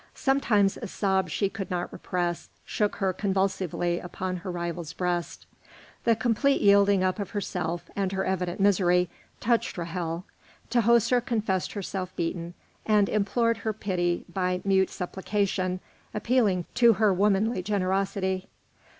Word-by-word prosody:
Sometimes 225 -8 +2
a 230 - -6
sob 190 -2 0
she 200 +6 0
could 195 0 -6
not 175 -1 -3
repress 175 -1 -3 0.2
shook 210 -1 0
her 190 -1 0
convulsively 190 -3 0
upon 185 +1 -4
her 180 +2 -7
rival's 170 -2 -4
breast. 180 -1 -2 0.6
The 230 - +5
complete 240 +5 +2
yielding 200 -1 +5
up 185 +2 0
of 200 -2 -3
herself, 180 -4 -3
and 195 -2 0
her 190 0 -1
evident 185 -1 -2
misery, 180 -3 +3 0.3
touched 235 +1 +1
Ra'hel. 170 0 -3 0.5
Tahoser 235 +1 +4
confessed 215 -6 -1
herself 190 -2 -4
beaten, 170 +1 -3 0.3
and 210 -2 +3
implored 230 +3 +1
her 220 - -2
pity 175 -4 -1
by 180 0 -1
mute 190 -1 +3
supplication, 185 0 -2 0.4
appealing 210 -5 +2
to 235 -2 +6
her 215 -1 +3
womanly 200 +2 +2
generosity. 190 -1 -1
190 Hz, 135 wpm, -27 LUFS, 180-210 Hz, 0.6 s, to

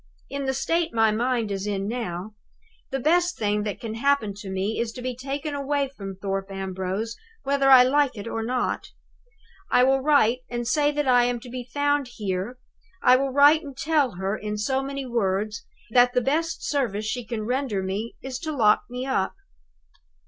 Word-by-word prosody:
In 280 0 -3
the 265 - 0
state 330 +2 0
my 225 -1 +4
mind 230 -1 0
is 195 +1 -3
in 200 -1 -2
now, 215 -4 -4 0.6
the 270 - -2
best 350 +6 +2
thing 210 -1 0
that 205 -2 -3
can 225 -2 -5
happen 235 -3 +1
to 205 -2 -8
me 190 +3 -2
is 230 -1 -1
to 250 - -8
be 255 -1 -3
taken 280 +4 -4
away 280 0 -1
from 195 -3 -6
Thorpe 195 0 -3
Ambrose, 195 +3 -3 0.3
whether 275 0 +2
I 260 -2 +9
like 275 -1 +2
it 205 - -6
or 225 - -3
not. 245 +2 -1 0.8
I 250 - +5
will 270 +1 +4
write 260 -4 +4
and 240 -1 -3
say 290 +3 +3
that 295 -1 -1
I 245 -1 +5
am 245 -1 -1
to 250 - -10
be 250 0 -5
found 285 0 +1
here 200 +3 -3 0.5
I 250 - +7
will 270 +1 +1
write 285 +4 +6
and 280 -5 -10
tell 290 -5 +1
her, 190 +3 -2
in 210 0 -4
so 265 +6 0
many 275 0 -4
words, 215 -2 -1 0.2
that 245 +1 +5
the 250 - +3
best 320 +6 -1
service 225 -8 -1
she 245 +3 -2
can 225 -2 -4
render 250 -5 -1
me 200 +5 -3
is 260 -1 -5
to 310 -1 -4
lock 210 -3 +5
me 250 +1 -4
up." 260 -8 0
245 Hz, 190 wpm, -25 LUFS, 210-275 Hz, 0.8 s, I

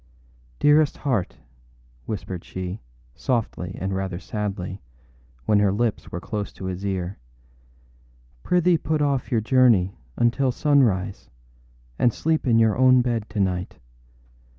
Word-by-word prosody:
âDearest 150 0 +4
heart,â 125 -11 -1 0.7
whispered 95 -4 -5
she, 95 +2 -6 0.3
softly 105 - -2
and 95 +1 -2
rather 95 -2 -3
sadly, 100 -2 -4 0.6
when 105 -1 +4
her 100 -1 +3
lips 110 +2 -1
were 90 - -4
close 105 +2 -4
to 95 - -9
his 95 +1 -4
ear, 95 -1 -3 1.2
âprithee 180 -1 +3
put 155 -1 0
off 140 -3 0
your 115 -3 +2
journey 110 -6 +3 0.2
until 125 +3 +2
sunrise 115 -10 +1 0.7
and 120 - +4
sleep 160 -3 0
in 115 -2 +4
your 110 -2 +4
own 130 0 +5
bed 115 -3 -2
to 105 -1 -4
night. 90 -1 -1
105 Hz, 130 wpm, -24 LUFS, 95-130 Hz, 1.2 s, own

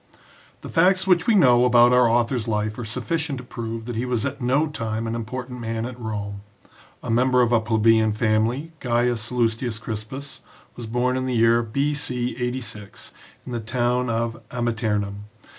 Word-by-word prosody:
The - - -8
facts 185 +3 +3
which 180 -3 +3
we 230 - +4
know 125 -9 +5
about 120 0 +6
our 125 -2 +5
author's 120 0 +1
life 105 0 -1
are - - -4
sufficient 140 +6 -3
to 125 - -8
prove 115 -2 -6
that 120 -1 -5
he 115 - -1
was 120 -3 -1
at - - -4
no 135 +5 +2
time 115 -7 -3
an 115 - -2
important 125 +2 -5
man 115 -1 -3
at 125 0 -7
Rome. 100 -3 -5 0.6
A - - -3
member 125 +2 +3
of 120 - +1
a 120 - +5
plebeian 110 0 +3
family, 110 +8 0
Gaius 120 -1 +1
Sallustius 115 -1 -1
Crispus 130 +6 -7 0.4
was 120 -2 -7
born 125 +3 0
in 130 0 -2
the 125 - -1
year 115 +1 +4
B.C. 125 0 -2
86 125 -5 -6 0.3
in 125 - -7
the 120 - -2
town 125 +2 0
of 115 0 -2
Amiternum. 110 -4 -2
120 Hz, 175 wpm, -23 LUFS, 110-125 Hz, 0.6 s, about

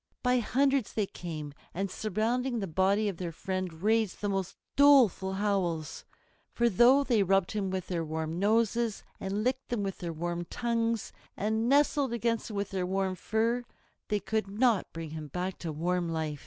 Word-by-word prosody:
By 250 0 +3
hundreds 270 0 +1
they 215 - +1
came, 155 -6 -7 0.2
and 195 +1 -2
surrounding 235 +6 -1
the 205 - -1
body 195 +5 +2
of 195 -4 -3
their 175 -2 -4
friend 185 +2 -3
raised 220 -2 +2
the 205 - -1
most 195 -2 -2 0.2
doleful 260 -10 +5
howls. 190 -6 -1 0.5
For, 235 0 +2
though 245 +7 +6
they 235 -6 +2
rubbed 195 -1 +2
him 205 -3 -1
with 185 -1 -3
their 170 -3 -2
warm 160 +1 -3
noses, 225 +2 +1 0.2
and 200 +2 -2
licked 260 +2 -1
him 230 -4 0
with 195 -1 -4
their 170 -1 -4
warm 175 +2 -3
tongues, 230 +1 -1 0.2
and 220 +3 0
nestled 280 -2 +3
against 230 -1 -1
him 215 - -6
with 200 0 -2
their 185 -2 -1
warm 190 0 0
fur, 225 +5 0 0.4
they 210 -1 0
could 215 +2 -1
not 215 +1 +1
bring 165 -2 -6
him 155 -1 -6
back 180 +6 -4
to 165 - -4
warm 175 +3 -1
life. 155 -3 -2
200 Hz, 180 wpm, -30 LUFS, 180-230 Hz, 0.5 s, though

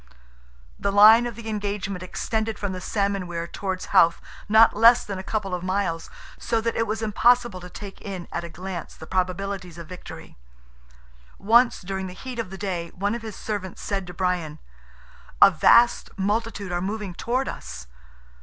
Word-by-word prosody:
The 200 - 0
line 220 +4 +7
of 235 - -7
the 230 0 -9
engagement 200 -3 -3
extended 220 +4 -3
from 200 -2 -3
the 185 -1 -6
salmon 200 -1 -1
weir 170 -1 -4
towards 190 +1 -4
Howth, 170 0 +5 0.3
not 220 +2 +6
less 230 +3 +6
than 200 -2 -5
a - - -6
couple 195 -2 -3
of 180 - -2
miles, 185 -3 -2 0.3
so 230 - 0
that 230 +1 -2
it 230 - 0
was 220 +1 -3
impossible 240 -1 +3
to 180 0 -10
take 200 +1 -10
in 190 -4 -6
at - - -3
a 170 - -6
glance 180 +1 -7
the 160 - -11
probabilities 185 0 -3
of 170 - -8
victory. 180 - -11 1.0
Once 235 +4 +4
during 190 0 -4
the 180 - -8
heat 250 +5 -8
of 225 -5 -3
the 190 - -8
day 180 -4 -3
one 200 +3 -1
of 235 - -4
his 220 -3 -7
servants 200 -4 -5
said 195 -3 -3
to 180 - -8
Brian, 175 -5 -1 0.8
"A - - +9
vast 235 0 +4
multitude 205 -1 -2
are 175 0 -1
moving 200 0 -4
towards 250 +8 -1
us." - - -9
195 Hz, 180 wpm, -24 LUFS, 180-220 Hz, 1.0 s, A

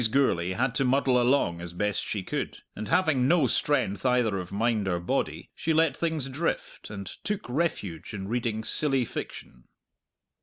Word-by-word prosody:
Gourlay 95 -9 +2
had 125 +4 0
to - - +4
muddle 130 -1 +3
along 120 -10 +2
as 85 0 -7
best 105 +3 0
she 100 -3 -3
could, - - -4
and 110 - -5
having 155 -7 +3
no 165 -2 +4
strength 130 -6 +1
either 125 -6 +2
of 90 -1 -7
mind 110 -1 +1
or 90 -2 0
body, 85 - -2
she 160 - -1
let 160 -1 +3
things 160 -5 -1
drift, 150 +5 -3
and 100 -2 -6
took 210 - -4
refuge 120 - -2
in 95 -3 -5
reading 115 -1 -1
silly 135 0 +2
fiction. 60 - -7
120 Hz, 165 wpm, -27 LUFS, 100-140 Hz, -, to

